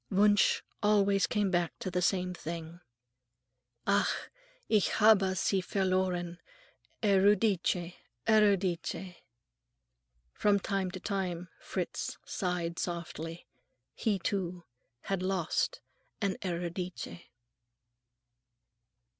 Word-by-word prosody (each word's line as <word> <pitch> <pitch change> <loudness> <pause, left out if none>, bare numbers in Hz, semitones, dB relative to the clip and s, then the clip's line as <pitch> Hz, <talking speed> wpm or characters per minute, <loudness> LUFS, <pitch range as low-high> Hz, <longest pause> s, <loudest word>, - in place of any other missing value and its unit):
Wunsch 205 +1 +4 0.2
always 200 -2 +3
came 205 -3 +1
back 175 -2 0
to 185 - -4
the 180 +1 0
same 180 0 +1
thing:— 165 0 -6 1.1
"Ach, 200 0 +1 0.4
ich 210 -3 +3
habe 200 -3 +5
sie 190 +1 +2
verloren,... 185 -2 0 0.6
Euridice, 195 -3 +3 0.3
Euridice!" 190 -4 +2 1.2
From 205 -1 +3
time 195 -1 -1
to 185 +1 -7
time 180 -3 -3
Fritz - - -4
sighed 175 -3 -2
softly. 170 -1 -4 0.5
He, 210 -3 0
too, 180 -2 -2 0.4
had 195 -2 -2
lost 190 - 0 0.4
a 200 - +1
Euridice. 175 0 -4
185 Hz, 90 wpm, -31 LUFS, 175-200 Hz, 1.2 s, habe